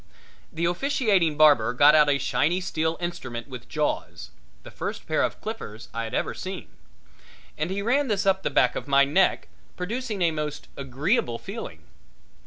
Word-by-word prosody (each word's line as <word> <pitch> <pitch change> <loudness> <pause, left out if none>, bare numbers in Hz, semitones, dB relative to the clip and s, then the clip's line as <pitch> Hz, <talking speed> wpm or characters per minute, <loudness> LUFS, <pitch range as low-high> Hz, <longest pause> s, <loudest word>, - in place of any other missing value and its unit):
The 165 +1 -2
officiating 190 - +1
barber 145 -7 +5
got 145 +4 +6
out 150 -1 +5
a 140 - +3
shiny 160 +5 +1
steel 160 -2 -1
instrument 130 -9 -5
with 125 -4 -10
jaws - - -3 0.3
the - - -11
first - - -5
pair - - +1
of - - -1
clippers 120 - -7
I 115 0 -3
had 110 - -5
ever - - -1
seen 185 0 -7 0.9
and 155 +3 -2
he 200 +1 -2
ran 270 +6 +2
this 205 -4 0
up 190 0 +3
the - - -1
back 130 -2 +3
of - - -5
my 140 0 +5
neck, 180 +7 +2 0.3
producing 215 +1 -3
a 170 - +3
most 150 -2 -5
agreeable 135 - -1
feeling. 200 - -8
160 Hz, 170 wpm, -25 LUFS, 140-195 Hz, 0.9 s, got